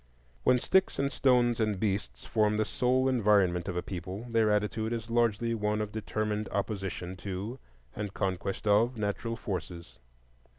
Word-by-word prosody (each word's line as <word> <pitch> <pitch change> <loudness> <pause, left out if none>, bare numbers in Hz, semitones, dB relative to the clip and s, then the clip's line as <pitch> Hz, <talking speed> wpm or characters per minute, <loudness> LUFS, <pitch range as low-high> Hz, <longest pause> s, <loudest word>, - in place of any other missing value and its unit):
When 125 - +5
sticks 190 +9 +2
and 140 0 0
stones 120 -4 +3
and 105 -3 0
beasts 100 -1 -2
form 105 -1 +2
the 110 - +2
sole 130 +4 +1
environment 100 -8 +3
of 90 -2 -3
a 90 - -1
people, 95 +4 -6
their 115 -2 +3
attitude 105 +2 0
is 115 -1 -5
largely 115 -1 +2
one 105 -1 0
of 105 -1 -3
determined 105 -1 -2
opposition 95 -3 -3
to 100 +7 -5 0.4
and 105 -2 -4
conquest 95 0 -2
of 115 +4 +3
natural 110 +2 -2
forces. 90 - -6
105 Hz, 155 wpm, -30 LUFS, 100-115 Hz, 0.4 s, When